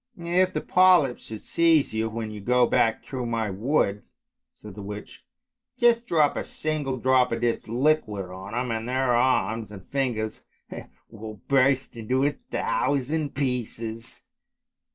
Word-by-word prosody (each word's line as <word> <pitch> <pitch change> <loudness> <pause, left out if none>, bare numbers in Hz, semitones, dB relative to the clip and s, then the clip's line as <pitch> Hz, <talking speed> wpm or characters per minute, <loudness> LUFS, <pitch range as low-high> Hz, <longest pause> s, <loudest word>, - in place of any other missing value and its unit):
" 245 - -41 0.3
If 185 0 -3
the - - 0
polyps 180 -8 +4
should 110 -1 -8
seize 165 -6 +3
you, 110 0 -1
when 110 -1 -5
you 105 -1 -8
go 125 +3 +3
back 115 -1 +1
through 125 -3 -5
my 115 -3 -1
wood," 105 -1 0 0.5
said 105 -2 -12
the 105 - -9
witch, 105 +1 -8 0.3
" - - -61
just 240 -1 +3
drop 155 -6 +3
a - - -2
single 150 -4 -3
drop 130 0 +3
of 115 0 -2
this 120 -1 -1
liquid 115 -7 0
on 95 +3 -9
them, 125 0 -1
and 115 +2 -4
their 130 -1 +1
arms 115 -3 +1
and 100 -3 -11
lingers 120 -6 -1 0.7
will 110 -1 -9
burst 135 -1 +2
into 125 +4 0
a 145 - +3
thousand 145 +1 -2
pieces." 115 -4 -4
125 Hz, 155 wpm, -25 LUFS, 110-140 Hz, 0.7 s, polyps